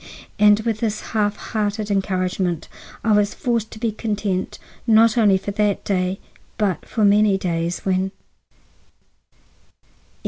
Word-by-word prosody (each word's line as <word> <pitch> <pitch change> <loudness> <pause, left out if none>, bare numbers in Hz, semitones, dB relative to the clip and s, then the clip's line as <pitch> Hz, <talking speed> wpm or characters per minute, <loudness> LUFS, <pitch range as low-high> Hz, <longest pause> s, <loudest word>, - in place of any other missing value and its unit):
And 210 0 +6
with 220 -1 -2
this 215 -2 -1
half 210 -1 +1
hearted 210 -1 -3
encouragement 185 -3 -1 0.4
I 225 - +2
was 205 -1 +2
forced 235 -3 -1
to - - -11
be 230 -1 0
content, 205 -3 -3 0.3
not 225 +1 +5
only 210 -5 +4
for 195 +2 -5
that 205 -1 0
day, 185 -1 -1 0.4
but 195 -6 -1
for 220 -3 +1
many 205 -1 +4
days, 170 -2 -2
when— 190 0 0 0.4
XI. - - -38
205 Hz, 135 wpm, -21 LUFS, 190-215 Hz, 0.4 s, And